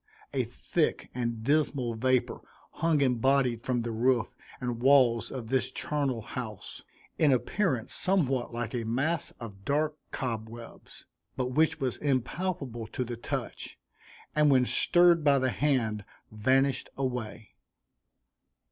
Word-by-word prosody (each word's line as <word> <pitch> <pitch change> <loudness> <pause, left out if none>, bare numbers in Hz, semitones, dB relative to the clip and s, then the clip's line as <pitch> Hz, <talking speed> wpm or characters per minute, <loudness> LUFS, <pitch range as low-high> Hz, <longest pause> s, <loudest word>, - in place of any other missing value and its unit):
A - - 0
thick - - -1
and 115 -2 -3
dismal 140 -3 +1
vapor 130 +2 +1 0.3
hung 160 -2 +1
embodied 130 -1 +2
from 125 -2 0
the 115 0 -3
roof 120 +1 +1 0.3
and 120 -2 -3
walls 125 -4 +4
of 120 -4 -6
this 130 0 +1
charnel 140 -6 -2
house, 110 -4 -7 0.4
in 150 -3 +5
appearance 130 - 0
somewhat 140 -10 0
like 120 0 -4
a 120 -2 -2
mass 140 +8 -1
of 100 -4 -9
dark 150 +5 0
cobwebs; 115 -1 -6 0.3
but 125 -1 -1
which 160 +4 +2
was 130 -3 -1
impalpable 135 -3 -2
to 125 - -3
the 120 0 -5
touch, 115 - -5 0.6
and 150 -1 +4
when 130 -2 +5
stirred 175 +3 +5
by 140 -2 +5
the 130 -1 +1
hand 120 -7 0 0.3
vanished 130 +5 +1
away. 125 -5 -4
130 Hz, 130 wpm, -29 LUFS, 115-140 Hz, 0.6 s, in